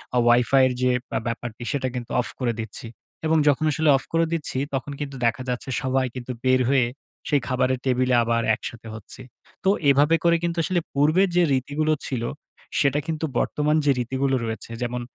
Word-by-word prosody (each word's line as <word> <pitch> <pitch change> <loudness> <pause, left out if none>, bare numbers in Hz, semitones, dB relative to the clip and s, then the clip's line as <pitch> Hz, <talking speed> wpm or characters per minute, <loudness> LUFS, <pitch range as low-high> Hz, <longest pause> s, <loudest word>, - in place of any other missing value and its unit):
আ - - +3
Wi-Fi 125 +3 +5
এর 125 - -1
যে, 125 0 +3 0.3
আ - - +1
ব্যাপারটি 120 0 -5
সেটা 135 -2 -1
কিন্তু 120 -2 -5
অফ - - -3
করে 120 -2 0
দিচ্ছি। 110 +1 -6 0.4
এবং 160 0 +3
যখন 145 +2 +3
আসলে 155 +1 +1
অফ - - -7
করে 165 0 +3
দিচ্ছি, 150 -5 -3 0.2
তখন 135 +2 -3
কিন্তু 140 -2 -5
দেখা 130 +3 0
যাচ্ছে 125 +2 -3
সবাই 130 0 +1
কিন্তু 125 0 -5
বের 130 0 +3
হয়ে, 135 -3 +4 0.4
সেই 145 -2 +2
খাবারের 130 0 +1
টেবিলে 125 -1 +2
আবার 115 0 +1
একসাথে 115 0 -8
হচ্ছি। 110 +4 -10 0.4
তো 190 - +3 0.2
এভাবে 145 +4 +5
করে 170 0 +4
কিন্তু 170 0 -1
আসলে 180 +2 +1
পূর্বের 155 +7 +3
যে, 175 - +5
রীতিগুলো 145 +4 0
ছিল, 120 -4 -2 0.6
সেটা 140 +1 +2
কিন্তু 160 0 -2
বর্তমান 150 +1 +1
যে, 140 - +5
রীতিগুলো 130 +2 0
রয়েছে, 115 +1 -5
যেমন 120 0 -2
130 Hz, 185 wpm, -24 LUFS, 125-150 Hz, 0.6 s, Wi-Fi